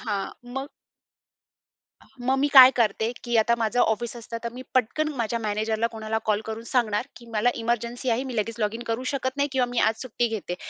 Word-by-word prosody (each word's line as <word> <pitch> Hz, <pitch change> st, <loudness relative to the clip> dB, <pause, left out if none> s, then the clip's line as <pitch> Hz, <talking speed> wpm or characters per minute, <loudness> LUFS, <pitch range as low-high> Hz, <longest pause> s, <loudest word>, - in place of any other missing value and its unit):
हां 200 Hz, -, -2 dB, 0.4 s
मग 270 Hz, +2 st, -3 dB, 1.5 s
मग 260 Hz, +2 st, +1 dB
मी 285 Hz, -, +3 dB
काय 260 Hz, -1 st, +11 dB
करते, 225 Hz, 0 st, +1 dB
की 240 Hz, -1 st, -2 dB
आता 235 Hz, +2 st, +3 dB
माझं 230 Hz, +1 st, 0 dB
ऑफिस 235 Hz, +1 st, +1 dB
असतं 230 Hz, 0 st, -6 dB
तर 235 Hz, -, -2 dB
मी 255 Hz, -, -8 dB
पटकन 280 Hz, +6 st, +1 dB
माझ्या 235 Hz, 0 st, -1 dB
मॅनेजरला 220 Hz, +1 st, -1 dB
कोणाला 220 Hz, -1 st, -3 dB
कॉल 215 Hz, 0 st, +1 dB
करून 220 Hz, +1 st, -5 dB
सांगणार, 235 Hz, -1 st, 0 dB
की 240 Hz, -, -13 dB
मला 220 Hz, +3 st, +3 dB
इमर्जन्सी 235 Hz, +2 st, -2 dB
आहे. 235 Hz, +3 st, +1 dB
मी 255 Hz, -3 st, -6 dB
लगेच 225 Hz, +2 st, -1 dB
लॉगिन 220 Hz, +3 st, -1 dB
करू 230 Hz, +3 st, -2 dB
शकत 260 Hz, 0 st, -2 dB
नाही 285 Hz, 0 st, +1 dB
किंवा 260 Hz, -2 st, +2 dB
मी 245 Hz, -1 st, -1 dB
आज 220 Hz, 0 st, +1 dB
सुट्टी 240 Hz, -1 st, -1 dB
घेते, 205 Hz, -5 st, -4 dB
235 Hz, 195 wpm, -25 LUFS, 220-250 Hz, 1.5 s, काय